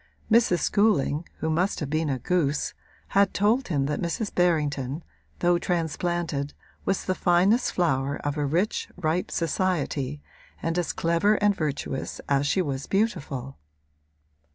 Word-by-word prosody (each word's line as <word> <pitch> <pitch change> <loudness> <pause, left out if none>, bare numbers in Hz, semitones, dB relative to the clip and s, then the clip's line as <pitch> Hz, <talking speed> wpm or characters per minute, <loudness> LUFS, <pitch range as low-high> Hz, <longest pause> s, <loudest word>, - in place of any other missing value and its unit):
Mrs. 220 -6 +4
Schooling, 175 -7 +2
who 160 - 0
must 180 +5 +1
have 145 -3 -4
been 155 0 0
a 135 - 0
goose, 150 +1 0 0.4
had 200 0 +3
told 225 +6 +2
him 145 -6 0
that 145 +1 -2
Mrs. 180 +5 -2
Berrington, 150 -4 +1 0.4
though 175 0 +3
transplanted, 170 -3 -1 0.3
was 195 - 0
the 185 - +1
finest 185 +7 +3
flower 140 -5 +1
of 145 0 -1
a 150 - -1
rich, 170 +9 0
ripe 170 0 0
society 155 -5 -1 0.4
and 165 +1 -1
as 175 - -1
clever 170 +6 +2
and 205 0 +3
virtuous 145 -4 -3
as 140 0 +2
she 185 +5 +2
was 135 -3 -4
beautiful. 150 - -1
165 Hz, 140 wpm, -26 LUFS, 145-185 Hz, 0.4 s, Mrs